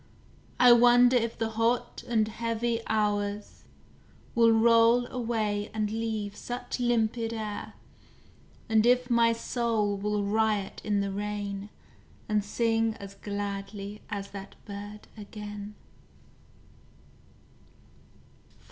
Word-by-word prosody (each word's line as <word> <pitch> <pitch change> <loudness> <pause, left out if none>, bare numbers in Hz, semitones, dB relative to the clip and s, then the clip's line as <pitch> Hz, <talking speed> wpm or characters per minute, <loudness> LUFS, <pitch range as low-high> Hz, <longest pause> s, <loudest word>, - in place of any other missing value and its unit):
I 250 -1 +8
wonder 245 +1 +6
if 230 -1 0
the 225 0 -1
hot 230 +2 0
and 220 -3 +2
heavy 230 +1 -2
hours 205 -1 -1 0.7
Will 230 -1 +5
roll 230 +1 +5
away 220 -4 -1
and 210 -1 -1
leave 220 -2 -3
such 245 +3 -5
limpid 230 -1 0
air, 215 -2 -5 0.9
And 220 -2 +3
if 250 0 +3
my 235 -1 +5
soul 230 -3 0
will 205 +1 -1
riot 210 -1 0
in 205 -1 +1
the 200 0 -2
rain, 205 0 -4 0.6
And 210 -1 +1
sing 225 +1 0
as 200 0 -10
gladly 200 0 -5
as 200 -1 -5
that 195 -1 -9
bird 205 +1 -8
again? 210 -1 -8
215 Hz, 105 wpm, -28 LUFS, 205-230 Hz, 0.9 s, I